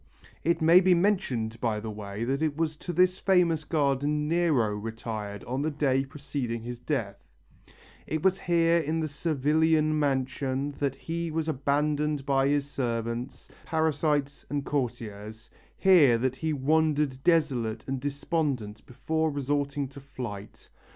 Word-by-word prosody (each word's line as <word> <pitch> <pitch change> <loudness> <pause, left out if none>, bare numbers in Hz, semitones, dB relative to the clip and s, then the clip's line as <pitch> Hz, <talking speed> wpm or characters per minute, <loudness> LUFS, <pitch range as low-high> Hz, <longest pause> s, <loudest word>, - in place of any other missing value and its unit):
It 170 -1 +1
may 165 +3 +8
be 185 -1 +4
mentioned, 135 - 0
by 110 -3 0
the 110 +1 -5
way, 105 0 -6
that 135 +4 -1
it 155 -2 0
was 160 -1 0
to 175 - -5
this 185 +2 +3
famous 175 -5 +3
garden 150 -1 0
Nero 150 -11 +2
retired 110 -1 -5
on 130 +3 -3
the 155 - 0
day 140 -3 +1
preceding 135 -5 -4
his 120 0 -6
death, 115 -8 -3 0.8
it 155 0 -2
was 190 0 +3
here 170 -1 +3
in 160 +1 -1
the 160 - -1
Servilian 155 +1 +1
mansion 135 0 -1
that 140 -2 0
he 165 +4 -4
was 160 0 -2
abandoned 150 0 0
by 135 -1 +2
his 145 0 +1
servants, 120 -1 -3 0.2
parasites 150 -3 0
and 145 0 -2
courtiers, 110 -5 -4 0.3
here 160 -11 +6
that 130 +2 -1
he 160 +4 -1
wandered 150 -1 +1
desolate 130 -10 +1
and 135 0 -2
despondent 140 -6 -2
before 160 +5 -1
resorting 145 0 -1
to 140 +1 -11
flight. 115 -7 -8
140 Hz, 145 wpm, -28 LUFS, 125-160 Hz, 0.8 s, may